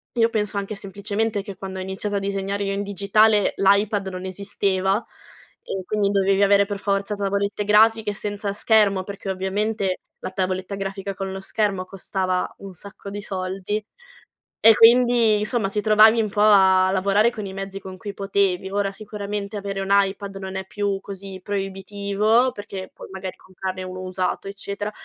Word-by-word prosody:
Io 230 -1 +3
penso 210 -2 -2
anche 200 +2 -3
semplicemente 205 +2 -2
che 200 -1 -8
quando 190 -1 -6
ho - - -3
iniziato 190 +2 -3
a - - +2
disegnare 195 0 -2
io 195 - -1
in 200 +1 -2
digitale 205 +1 +3
l'iPad 200 0 +3
non 185 0 -6
esisteva, 195 +1 0 0.6
e 190 -1 -4
quindi 205 -1 +1
dovevi 195 0 +2
avere 200 0 +5
per 200 -1 -5
forza 200 +1 -1
tavolette 200 +1 -1
grafiche, 220 0 +4
senza 205 0 -3
schermo 205 -3 +3
perché 200 -1 -7
ovviamente 190 +1 -1 0.2
la - - -5
tavoletta 185 +1 -2
grafica 195 0 -4
con 195 -1 -4
lo 190 - -5
schermo, 195 -2 -1
costava 185 -1 -2
un 195 -1 -9
sacco 200 +2 -10
di 205 +1 -6
soldi 190 +2 -3 0.8
e 225 0 +8
quindi 235 -2 +6
insomma 215 -2 0
ti 210 - -1
trovavi 220 +1 +6
un 215 - -2
po' 205 - -2
a 190 -3 +6
lavorare, 200 +4 +3
con 215 -3 -6
i 190 - -6
mezzi 195 0 -5
con 190 -1 -9
cui 205 -1 -7
potevi. 195 -1 0
Ora 200 0 0
sicuramente 205 0 -5
avere 195 -1 -4
un 195 - -4
iPad 200 0 +1
non 190 0 -6
è 190 - -3
più 200 -1 -2
così 195 -1 -8
proibitivo, 200 +4 0
perché 195 -4 -7
poi - - -11
magari 190 -1 -6
comprarne 185 0 -6
uno 185 0 -7
usato 185 +1 -2
eccetera, 200 +1 -4
200 Hz, 170 wpm, -23 LUFS, 190-210 Hz, 0.8 s, e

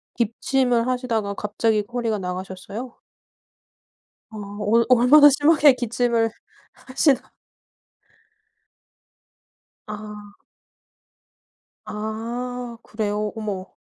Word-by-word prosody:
기침을 240 +1 0
하시다가 235 -5 -1
갑자기 210 +1 0
허리가 230 -3 -1
나가셨어요? 190 +6 -7 1.3
아. 220 - -10 0.2
얼 230 +3 +2
얼마나 265 +5 +7
심하게 290 0 +5
기침을 235 -1 0 0.4
하시다 270 0 0 2.5
아. 210 -1 -9 1.5
아 230 +3 -5
그래요? 210 -1 -3
어머. 205 -4 -5
230 Hz, 170 characters per minute, -22 LUFS, 210-250 Hz, 2.5 s, 얼마나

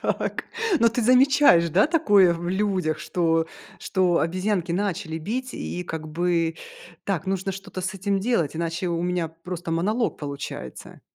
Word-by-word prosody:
Так. - - -2 0.4
Но 230 - +6
ты 235 +2 -2
замечаешь, 255 -8 +5
да, 195 - +4
такое 205 - +4
в 175 +1 -5
людях, 185 -5 0
что 165 0 0 0.3
что 180 -3 +1
обезьянки 185 +1 -1
начали 180 -3 -2
бить 250 +9 -4
и, 180 - -4
как 160 -2 -6
бы: 165 0 0 0.5
"Так 190 -3 -2
нужно 195 0 -1
что-то 190 -1 -7
с 190 +2 -3
этим 195 +1 -1
делать, 180 - 0
иначе 170 +2 -2
у 170 0 -1
меня 175 -2 -1
просто 165 +1 -7
монолог 210 +8 0
получается". 140 - -7
180 Hz, 150 wpm, -24 LUFS, 165-200 Hz, 0.5 s, Но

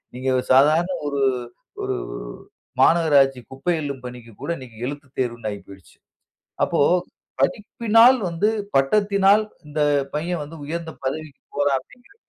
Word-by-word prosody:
நீங்க 130 +1 -1 0.2
சாதாரண 155 +7 +5 0.2
ஒரு, 140 -1 -1 0.6
ஒரு - - -1 0.9
மாநகராட்சி 140 -6 +4
குப்பை 165 +6 -1
அள்ளும் 140 -3 -5
பணிக்கு 120 -2 -9
கூட - - -5
இன்னக்கி 120 -4 -12
எழுத்து 145 0 -7
தேர்வுன்னு 120 -3 -2
ஆயி 100 - -6
போயிடுச்சு. 95 -2 -15 0.7
அப்போ, - - 0 0.6
படிப்பினால் 225 - +4
வந்து 170 +5 0 0.3
பட்டத்தினால் 200 +7 +3 0.2
இந்த 150 +1 -3 0.3
பையன் 170 +1 -2
வந்து 155 +3 -10
உயர்ந்த 165 +1 -4
பதவிக்கு 150 +1 -5
போறான் 145 -1 +2
அப்பிடிங்கிற 245 - -21
145 Hz, 120 wpm, -22 LUFS, 130-175 Hz, 0.9 s, சாதாரண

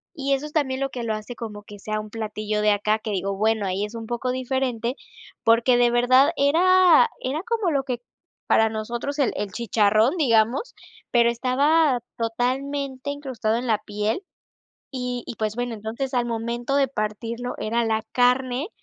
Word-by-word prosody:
y 275 -2 0
eso 275 +2 -1
es 300 - -8
también 265 -4 0
lo 275 - 0
que 245 -3 -5
lo 220 -1 -1
hace 215 +3 -6
como 210 -3 -7
que 205 -1 -12
sea 215 +1 -3
un 215 - -10
platillo 215 -1 -3
de 210 0 +4
acá, 210 +2 +1
que 215 -1 -5
digo, 195 0 -2
bueno, 220 0 +1
ahí 195 +2 -1
es 220 +2 -9
un 225 -1 -6
poco 240 +2 -2
diferente, 255 -1 -2 0.5
porque 235 +2 +4
de 240 -1 +4
verdad 255 +5 +5
era 340 0 +5
era 285 +6 -2
como 445 -6 0
lo 275 -2 +1
que 250 -3 -4 0.5
para 220 0 +4
nosotros 235 +6 -4
el 275 - +2
el 205 -1 -3
chicharrón, 220 - +2
digamos, 250 - +2 0.4
pero 235 -1 +4
estaba 265 +3 +2 0.2
totalmente 260 +4 -2
incrustado 260 -6 -2
en 245 +1 -4
la 220 -2 +3
piel 210 - -2 0.7
y 250 -2 -3
y, - - -7
pues 215 -1 -2
bueno, 245 -1 -2
entonces 225 +5 -5
al 245 -1 +1
momento 235 +3 -2
de 275 - +3
partirlo 230 +1 -4
era 230 +2 0
la 220 -1 0
carne 250 - +2
240 Hz, 180 wpm, -24 LUFS, 220-270 Hz, 0.7 s, verdad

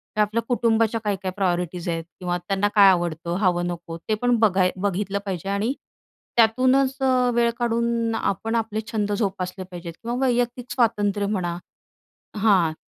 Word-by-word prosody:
हे 215 - +2
आपल्या 215 +2 +1
कुटुंबाच्या 230 -2 +2
काय-काय 195 -2 -2
प्रायोरिटीज् 180 -2 -1
आहेत 165 -1 -2 0.2
किंवा 180 -1 -1
त्यांना 195 +1 +1
काय 200 -2 +8
आवडतं, 170 -1 0
हवं 175 -3 +1
नको 170 -1 -6
ते - - +3
पण 245 -1 +3
बघाय 190 -4 +3
बघितलं 200 +1 -1
पाहिजे. 190 -1 -4
आणि 210 +6 0 0.6
त्यातूनंच 255 +4 +4
अ, 255 -1 +3
वेळ 235 0 +3
काढून 235 -1 0
आपण 225 +4 -1
आपले 220 -1 -1
छंद 210 -2 -1
जोपासले 185 -1 -3
पाहिजेत. 170 -1 -7
किंवा 240 +1 -2
वैयक्तिक 245 0 -1
स्वातंत्र्य 205 -4 +1
म्हणा, 175 -4 -2 0.8
हां. 190 -7 +3
205 Hz, 150 wpm, -23 LUFS, 180-230 Hz, 0.8 s, काय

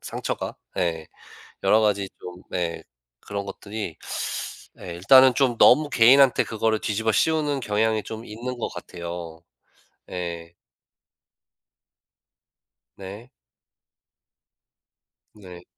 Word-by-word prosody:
상처가 - - -5 0.2
예. 80 -3 -1 0.5
여러 110 - +4
가지 100 -2 +1
좀 90 0 -10
네. 85 -2 -3 0.4
그런 100 -1 -5
것들이 100 -3 -6 0.8
예 90 - -7
일단은 130 +8 +7
좀 130 -4 +2
너무 150 +4 +6
개인한테 130 +2 +6
그거를 110 0 -1
뒤집어 110 +1 0
씌우는 150 -2 +1
경향이 110 0 0
좀 110 +1 -7
있는 120 +4 -6
것 - - -2
같아요. 85 -1 -8 0.7
예. 85 -2 -6 2.4
네. 100 +6 -10 2.0
네. 90 -4 -13
105 Hz, 185 characters per minute, -24 LUFS, 90-120 Hz, 2.4 s, 일단은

